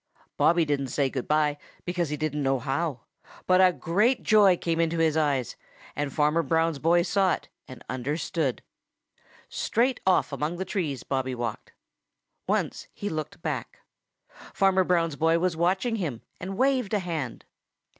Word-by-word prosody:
Bobby 170 Hz, -1 st, +3 dB
didn't 140 Hz, -2 st, -1 dB
say 135 Hz, +1 st, 0 dB
good 130 Hz, -3 st, -4 dB
by, 150 Hz, -1 st, +2 dB, 0.3 s
because 175 Hz, -3 st, -1 dB
he 150 Hz, -, -3 dB
didn't 150 Hz, 0 st, -2 dB
know 135 Hz, -1 st, +2 dB
how. 135 Hz, +2 st, -2 dB, 0.4 s
But 185 Hz, 0 st, +5 dB
a 185 Hz, -, +6 dB
great 205 Hz, +10 st, +1 dB
joy 205 Hz, -4 st, +5 dB
came 165 Hz, -1 st, -1 dB
into 165 Hz, 0 st, +1 dB
his 160 Hz, -2 st, +2 dB
eyes, 145 Hz, -5 st, 0 dB, 0.4 s
and 145 Hz, -1 st, -2 dB
Farmer 150 Hz, +3 st, +2 dB
Brown's 165 Hz, 0 st, +1 dB
boy 170 Hz, +3 st, +3 dB
saw 195 Hz, 0 st, +2 dB
it -, -, -14 dB, 0.2 s
and 130 Hz, -, -11 dB
understood. 140 Hz, +2 st, -2 dB, 0.8 s
Straight 245 Hz, +2 st, 0 dB
off 185 Hz, -, +3 dB
among 155 Hz, +4 st, -2 dB
the 190 Hz, -, -3 dB
trees 155 Hz, -, -3 dB
Bobby 130 Hz, -1 st, -2 dB
walked. 120 Hz, -3 st, -5 dB, 0.7 s
Once -, -, -1 dB
he 205 Hz, -, -4 dB
looked 155 Hz, 0 st, -5 dB
back. -, -, -4 dB, 0.7 s
Farmer 190 Hz, -1 st, +4 dB
Brown's 165 Hz, -4 st, +1 dB
boy 165 Hz, +1 st, +3 dB
was 180 Hz, 0 st, 0 dB
watching 190 Hz, +7 st, +1 dB
him 150 Hz, -, -4 dB, 0.2 s
and 190 Hz, +2 st, -5 dB
waved 255 Hz, -5 st, +2 dB
a -, -, +2 dB
hand. 160 Hz, -9 st, -4 dB
165 Hz, 155 wpm, -26 LUFS, 145-185 Hz, 0.8 s, a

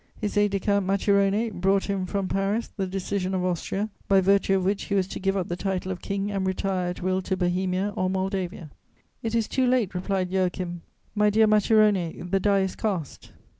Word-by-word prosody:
His 210 Hz, -, -3 dB
aide 205 Hz, 0 st, +4 dB
de 200 Hz, 0 st, -1 dB
camp 200 Hz, -1 st, +1 dB
Macirone 200 Hz, +3 st, +2 dB
brought 195 Hz, +1 st, +1 dB
him 195 Hz, -2 st, -2 dB
from 195 Hz, 0 st, -2 dB
Paris 195 Hz, +4 st, -1 dB
the 195 Hz, -2 st, -2 dB
decision 190 Hz, 0 st, -2 dB
of 180 Hz, -1 st, 0 dB
Austria, 190 Hz, +4 st, -2 dB, 0.2 s
by 195 Hz, -1 st, +5 dB
virtue 195 Hz, +1 st, +3 dB
of 190 Hz, -1 st, 0 dB
which 200 Hz, +1 st, 0 dB
he 200 Hz, -, -1 dB
was 190 Hz, -2 st, +2 dB
to -, -, -5 dB
give 195 Hz, 0 st, 0 dB
up 185 Hz, -, -1 dB
the 175 Hz, -, -2 dB
title 185 Hz, 0 st, -2 dB
of 185 Hz, -, -5 dB
King 200 Hz, +1 st, -2 dB
and 195 Hz, -1 st, -1 dB
retire 185 Hz, -1 st, -1 dB
at 180 Hz, -, -6 dB
will 185 Hz, 0 st, +1 dB
to 190 Hz, 0 st, -2 dB
Bohemia 185 Hz, +2 st, 0 dB
or 185 Hz, -, 0 dB
Moldavia: 185 Hz, -4 st, -3 dB, 0.5 s
"It 225 Hz, 0 st, -2 dB
is 230 Hz, -2 st, +1 dB
too 260 Hz, -1 st, +1 dB
late," 245 Hz, -7 st, +1 dB
replied 185 Hz, 0 st, -1 dB
Joachim; 180 Hz, -2 st, -1 dB, 0.3 s
"my 210 Hz, 0 st, +3 dB
dear 220 Hz, +2 st, +4 dB
Macirone, 210 Hz, -5 st, +2 dB
the 195 Hz, -, +3 dB
die 200 Hz, 0 st, +3 dB
is 190 Hz, -1 st, -2 dB
cast." 185 Hz, -, -3 dB
195 Hz, 205 wpm, -25 LUFS, 185-200 Hz, 0.5 s, by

